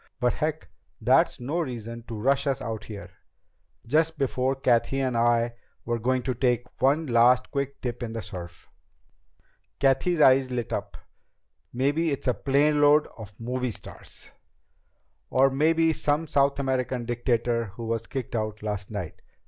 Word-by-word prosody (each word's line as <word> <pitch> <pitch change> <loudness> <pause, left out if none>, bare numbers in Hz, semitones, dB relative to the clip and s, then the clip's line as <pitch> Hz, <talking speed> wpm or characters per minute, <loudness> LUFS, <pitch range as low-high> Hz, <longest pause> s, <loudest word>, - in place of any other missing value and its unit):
But 125 -1 +2
heck, 155 +1 -3 0.3
that's - - +3
no 140 +8 -2
reason 115 -6 -5
to 115 - -6
rush 140 +4 +1
us 135 -2 0
out 110 -1 -5
here, 105 -2 -9 0.7
just 160 +5 +1
before 130 -1 0
Cathy 130 0 +1
and 130 -2 0
I 115 0 +2 0.3
were 120 0 -1
going 130 +2 0
to 130 - -1
take 125 -1 +1 0.2
one 145 +5 +3
last 125 0 +4
quick 140 0 -3
dip 120 -1 -4
in 115 -2 -4
the 115 -2 -4
surf." 90 -4 -9 1.1
Cathy's 140 +5 +2
eyes 130 -2 +5
lighted 120 -3 -3
up. - - -4 0.7
"Maybe 145 +6 +1
it's 140 -2 -3
a 125 - +4
planeload 145 +2 +3
of 105 -3 -11
movie 125 +2 -2
stars!" 110 - -9 1.0
"Or 135 +1 +4
maybe 160 +3 +3
some 150 +1 0
South 140 -2 +2
American 130 -3 -1
dictator 120 -1 0
who 105 +3 -8
was 115 0 -2
kicked 130 -3 -5
out 110 -1 -3
last 105 -2 -4
night." 100 -6 -6
125 Hz, 150 wpm, -26 LUFS, 115-140 Hz, 1.1 s, eyes